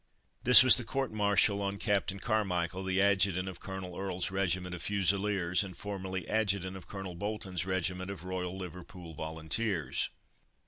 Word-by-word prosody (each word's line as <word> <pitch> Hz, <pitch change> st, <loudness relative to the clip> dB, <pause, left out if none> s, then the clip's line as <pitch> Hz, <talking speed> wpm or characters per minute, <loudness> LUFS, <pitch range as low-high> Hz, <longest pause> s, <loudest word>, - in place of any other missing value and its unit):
This 125 Hz, +1 st, +11 dB
was 130 Hz, -5 st, +8 dB
the 125 Hz, -, -3 dB
court 135 Hz, +1 st, -3 dB
martial 100 Hz, -1 st, +2 dB
on 100 Hz, 0 st, -2 dB
Captain 100 Hz, -2 st, -1 dB
Carmichael, 95 Hz, -4 st, -1 dB
the 95 Hz, 0 st, 0 dB
Adjutant 95 Hz, -2 st, +2 dB
of 90 Hz, -2 st, -7 dB
Colonel 95 Hz, -2 st, -7 dB
Earle's 95 Hz, -1 st, -3 dB
regiment 95 Hz, -1 st, -1 dB
of 90 Hz, -, -6 dB
Fusiliers, 100 Hz, -2 st, +1 dB
and 95 Hz, -3 st, -9 dB
formerly 95 Hz, -2 st, -5 dB
adjutant 100 Hz, -4 st, 0 dB
of 90 Hz, -3 st, -11 dB
Colonel 95 Hz, -2 st, -7 dB
Bolton's 95 Hz, -1 st, -3 dB
regiment 95 Hz, 0 st, -2 dB
of 100 Hz, -4 st, -7 dB
"Royal 90 Hz, 0 st, -4 dB
Liverpool 90 Hz, -2 st, -9 dB
Volunteers." 80 Hz, +4 st, -1 dB
95 Hz, 150 wpm, -31 LUFS, 90-100 Hz, -, This